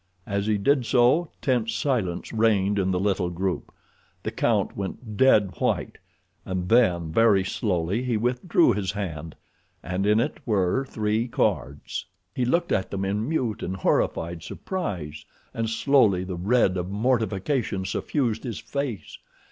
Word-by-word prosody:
As 100 0 -2
he 105 -1 +2
did 135 +6 +2
so 130 +7 +3
tense 115 -4 +1
silence 110 -10 -1
reigned 105 -3 +2
in 95 -1 +1
the 90 -1 +1
little 95 -2 0
group. 90 +1 -3 0.5
The - - -2
count - - 0
went 105 +3 -6
dead 105 -6 +4
white, - - -1 0.4
and 90 -1 -3
then 90 -9 +3
very 105 0 +4
slowly 95 +1 -1
he 125 -3 0
withdrew 125 - +2
his 100 -1 -2
hand, 80 -6 -5 0.5
and 95 +2 -1
in 105 +1 +4
it 135 +6 -1
were 105 +4 +1
three 110 -1 -1
cards. 70 - -2 0.3
He 125 - 0
looked 170 +7 +1
at 95 - 0
them 95 0 -3
in 105 +6 -1
mute 120 -9 -1
and 95 - -3
horrified 85 -2 0
surprise, 85 - -5 0.3
and 115 -1 -2
slowly 115 -6 +3
the 95 -1 -5
red 95 +1 +2
of 90 0 -3
mortification 110 -1 0
suffused 115 +3 -1
his 115 -6 -4
face. 140 -7 -5
105 Hz, 150 wpm, -25 LUFS, 95-120 Hz, 0.5 s, dead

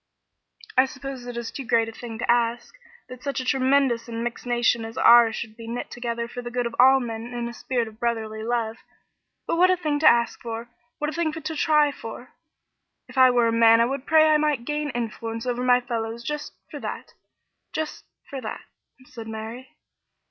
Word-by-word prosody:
"I 260 +1 +5
suppose 270 -2 -8
it 245 -1 -6
is 235 -1 -4
too 275 - -6
great 230 -2 +2
a - - -6
thing 225 0 -8
to 240 +1 +1
ask 235 0 0 0.3
that 255 0 -10
such 280 0 -3
a 255 - -4
tremendous 265 -2 +2
and 230 0 -4
mixed 240 +1 -5
nation 240 -1 +2
as 225 0 -8
ours 235 -2 +7
should 220 -2 -6
be 230 0 -10
knit 235 +1 -5
together 235 -1 -3
for 245 +1 -7
the 240 - -6
good 245 0 -2
of 235 - -4
all 265 +2 +7
men 230 -2 -5
in 240 -1 -3
a 235 - -7
spirit 245 -1 -2
of 220 0 -13
brotherly 220 -2 -2
love 225 -1 -1 0.7
but - - -1
what 365 +2 +5
a 370 - +3
thing 305 -4 -1
to 310 - +5
ask 235 0 +1
for! 230 0 -6 0.3
What 300 +1 -2
a - - -9
thing 335 -2 0
to 320 0 -5
try 300 -1 +3
for! 240 -1 -9 0.7
If 255 - -14
I 260 -1 +7
were 240 -2 +3
a - - +1
man, 230 0 +6
I 230 - +5
would 270 +2 -4
pray 315 -1 +6
that 310 0 +5
I - - +5
might 300 -5 0
gain 295 +1 -2
influence 230 -2 -4
over 245 0 -1
my 250 0 +5
fellows 235 -2 -4
just 300 +4 -4 0.2
for - - -6
that - - -6 0.6
just 315 -1 -4 0.2
for 275 -2 -6
that," 220 - -6 0.4
said 230 -3 -10
Mary. 225 +3 -8
240 Hz, 215 wpm, -24 LUFS, 230-270 Hz, 0.7 s, ours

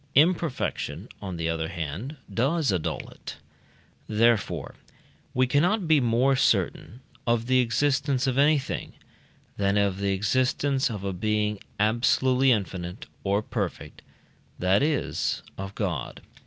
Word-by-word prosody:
Imperfection, 165 -1 +1
on 95 -4 -5
the 80 0 -2
other 80 -1 -1
hand, 85 - -5 0.2
does 135 - +1
annul 90 -4 -2
it; - - -9 0.7
therefore 115 0 +1 0.6
we 130 +1 +4
cannot 170 - +2
be 155 -2 +5
more 125 +2 +3
certain 125 -1 0 0.3
of 115 -1 +2
the 130 +1 +3
existence 135 +2 +1
of 130 -2 0
anything, 140 0 +1 0.6
than 100 0 +1
of 100 -2 +1
the 100 0 0
existence 130 +7 +1
of 105 -4 -5
a 100 -1 -2
being 105 +2 0 0.2
absolutely 125 +4 +3
infinite 95 -4 -2 0.2
or 100 +2 +1
perfect - - -4 0.6
that 95 +4 +3
is, 150 -1 0
of 95 0 -7
God. 90 - -3
115 Hz, 125 wpm, -26 LUFS, 100-135 Hz, 0.7 s, be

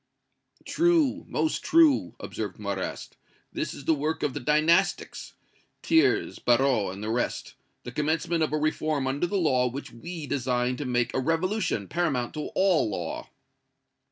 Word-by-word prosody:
"True, 335 -5 +2
most 315 - -1
true!" 320 -4 +4
observed - - -5
Marrast; - - -5 0.4
"this - - -2
is - - -10
the 160 - +4
work 155 +2 -2
of 140 - 0
the - - -4
Dynastics 155 +7 +1 0.5
Thiers, 325 0 +2
Barrot 120 -5 +2
and 100 - -8
the 110 - -2
rest 120 +2 -2 0.3
the 125 - -7
commencement 160 +4 0
of 155 - +1
a 155 - +1
reform 155 -2 0
under 140 +6 0
the 200 - -1
law 130 -8 +2
which 135 +4 -7
we 165 +7 -7
design 125 -2 0
to 145 - -4
make 120 -2 0
a - - 0
revolution 165 - 0
paramount 140 - -1
to 150 -1 -4
all 185 - +3
law." 85 -5 -5
150 Hz, 155 wpm, -27 LUFS, 125-170 Hz, 0.5 s, true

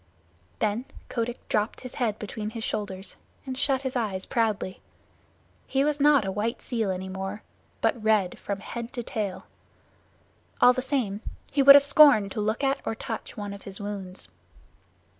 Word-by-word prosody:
Then 210 - 0 0.2
Kotick 235 0 -3
dropped 210 +1 -1
his 255 -2 -8
head 220 -3 +1
between 210 0 -5
his 225 0 -6
shoulders 195 -3 -4 0.3
and 260 -1 -4
shut 270 0 0
his 260 -1 -3
eyes 205 -6 -2
proudly. 215 -5 -1 0.9
He 270 0 +1
was 300 0 0
not 285 -5 +5
a 190 - -1
white 215 +4 -2
seal 225 -5 -2
any 185 0 -3
more, 195 +2 -5 0.4
but 230 - +1
red 215 -4 +2
from 200 -1 -4
head 235 +3 -6
to 240 -3 -4
tail. 205 -5 -4 1.1
All 250 - +7
the 255 - -2
same 245 -7 -1 0.3
he 280 - +2
would 275 +1 +11
have 285 0 +7
scorned 280 -9 +6
to 215 - -3
look 220 +6 -1
at 275 0 +2
or 225 - -2
touch 225 0 -6
one 205 -1 -5
of 200 - -10
his 195 -1 -4
wounds. 200 -2 -6
220 Hz, 170 wpm, -26 LUFS, 200-255 Hz, 1.1 s, would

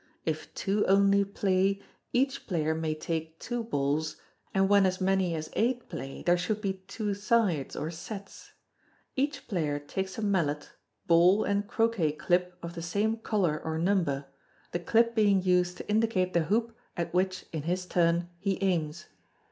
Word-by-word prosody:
If 155 -1 -3
two 205 +1 +1
only 200 +1 +5
piay, 195 0 +1 0.3
each 265 +2 0
player 160 -4 0
may 160 -1 -1
take 160 0 -4
two 240 -1 -3
balls, 150 -5 -1 0.4
and 195 0 +3
when 200 -1 +5
as 185 0 -2
many 190 -2 +1
as 155 0 -5
eight 245 +2 0
play, 135 0 -6
there 175 0 +3
should 205 +4 -1
be 190 -3 -3
two 210 -3 -2
sides 200 - +1
or 155 - -3
sets. 195 +4 -9 0.6
Each 280 +2 -1
player 155 -8 -1
takes 190 +6 -4
a 220 - -3
mallet, 165 -8 0 0.3
ball, 175 +5 +5
and 200 0 0
croquet 225 -9 +1
clip 180 +3 0
of 170 0 -5
the 170 - -6
same 205 +6 0
colour 195 -9 0
or 160 0 -2
number, 165 -6 +1 0.5
the 175 - -1
clip 230 +6 +3
being 205 -4 +3
used 180 -1 +2
to - - -8
indicate 210 -4 +1
the 170 -2 +2
hoop 225 +5 0 0.2
at 170 0 -2
which, 185 +1 0
in 160 - -2
his 180 +4 -2
turn, 170 -1 +2
he 195 0 0
aims. 170 -4 0
185 Hz, 165 wpm, -29 LUFS, 165-205 Hz, 0.6 s, only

